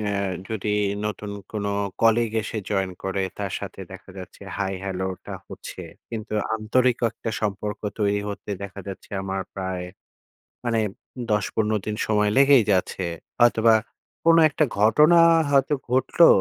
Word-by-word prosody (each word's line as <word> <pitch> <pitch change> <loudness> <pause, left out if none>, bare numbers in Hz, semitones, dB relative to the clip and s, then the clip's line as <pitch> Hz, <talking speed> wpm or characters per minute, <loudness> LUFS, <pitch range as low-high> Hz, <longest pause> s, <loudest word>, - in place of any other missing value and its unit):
অ্যা 105 -1 -1 0.4
যদি 110 -2 -3 0.4
নতুন 105 0 -4 0.2
কোনো 100 -2 -2 0.3
কলিগ 115 0 +4
এসে 110 +1 -4
জয়েন 95 -2 0
করে, 95 0 -1 0.2
তার 100 -2 -3
সাথে - - -7
দেখা - - -11
যাচ্ছে 95 +2 -10
হাই, 95 -1 -1
হ্যালোটা 95 -1 -4
হচ্ছে। - - -8 0.3
কিন্তু 110 -1 -6 0.2
আন্তরিক 120 +3 +2
ক - - -19
একটা 115 - -5
সম্পর্ক 105 0 -3 0.2
তৈরি 100 -1 +1
হতে 100 +1 -6
দেখা 100 0 -7
যাচ্ছে 95 - -9
আমার 95 0 -3
প্রায় 95 -2 -3 0.8
মানে 115 -2 +1 0.5
১০-১৫ 105 +1 +1
দিন 105 0 -2
সময় 105 -1 +2
লেগেই 135 -3 +6
যাচ্ছে। 95 0 0 0.3
হয়তোবা 115 -1 +5 0.5
কোন 165 0 +6
একটা 155 +1 +1
ঘটনা 150 +11 +6 0.3
হয়তো 140 +1 +3 0.2
ঘটলো। 130 +6 +5
105 Hz, 140 wpm, -24 LUFS, 100-115 Hz, 0.8 s, লেগেই